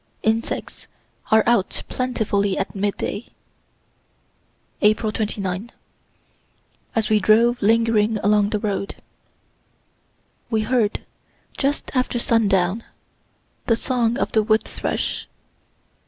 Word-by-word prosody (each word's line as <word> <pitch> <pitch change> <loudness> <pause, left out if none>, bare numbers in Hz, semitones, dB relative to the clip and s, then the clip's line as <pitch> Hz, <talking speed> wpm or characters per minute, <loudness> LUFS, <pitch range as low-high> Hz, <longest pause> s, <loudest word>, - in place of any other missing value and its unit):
Insects 225 +1 -2 0.4
are 220 0 +5
out 230 -5 +1
plentifully 205 -6 -1
at 195 - -2
midday. 205 +2 -2 1.5
April 215 +1 +3
29. 205 0 -3 1.2
As 220 -1 +1
we 215 - +5
drove 230 +4 +4
lingering 225 0 +3
along 205 0 +3
the 215 - 0
road 200 -2 -3 1.5
we 220 -2 +1
heard, 220 -1 0 0.5
just 280 +1 -1
after 255 -2 0
sundown, 210 -3 +2 0.8
the 230 - +4
song 235 0 0
of - - -1
the 220 - +3
wood 215 +1 +2
thrush. - - -3
220 Hz, 95 wpm, -22 LUFS, 205-230 Hz, 1.5 s, are